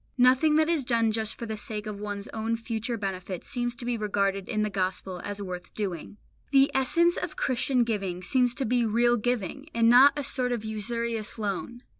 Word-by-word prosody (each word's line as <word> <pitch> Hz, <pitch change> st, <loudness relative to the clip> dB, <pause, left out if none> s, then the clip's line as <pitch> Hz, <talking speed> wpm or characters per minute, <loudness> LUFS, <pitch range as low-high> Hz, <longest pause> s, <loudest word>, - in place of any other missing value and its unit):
Nothing 260 Hz, +5 st, +5 dB
that 310 Hz, 0 st, +4 dB
is 330 Hz, -4 st, +1 dB
done 230 Hz, -2 st, +2 dB
just 220 Hz, 0 st, -2 dB
for 235 Hz, -, -6 dB
the 220 Hz, -1 st, -4 dB
sake 210 Hz, 0 st, -5 dB
of 210 Hz, -2 st, -5 dB
one's 205 Hz, 0 st, -5 dB
own 225 Hz, +1 st, -2 dB
future 230 Hz, 0 st, -3 dB
benefit 190 Hz, -3 st, -4 dB
seems 240 Hz, -3 st, -2 dB
to 240 Hz, -, -7 dB
be 240 Hz, -1 st, -1 dB
regarded 195 Hz, -2 st, -1 dB
in 215 Hz, -2 st, 0 dB
the 210 Hz, -, 0 dB
Gospel 185 Hz, -1 st, -2 dB
as 205 Hz, 0 st, -4 dB
worth 180 Hz, -1 st, -7 dB
doing. 195 Hz, -2 st, -4 dB, 0.3 s
The 275 Hz, 0 st, +5 dB
essence 340 Hz, +7 st, +3 dB
of -, -, -4 dB
Christian 255 Hz, -1 st, +1 dB
giving 195 Hz, -6 st, -3 dB
seems 245 Hz, +5 st, +2 dB
to 270 Hz, -, -2 dB
be 245 Hz, +1 st, +2 dB
real 235 Hz, +2 st, +3 dB
giving, 245 Hz, -, -2 dB
and 230 Hz, 0 st, +5 dB
not 270 Hz, +4 st, +7 dB
a 290 Hz, -, -1 dB
sort 250 Hz, -1 st, 0 dB
of 225 Hz, -2 st, -4 dB
usurious 225 Hz, +1 st, -3 dB
loan. 220 Hz, +4 st, -4 dB
230 Hz, 200 wpm, -27 LUFS, 205-250 Hz, 0.3 s, not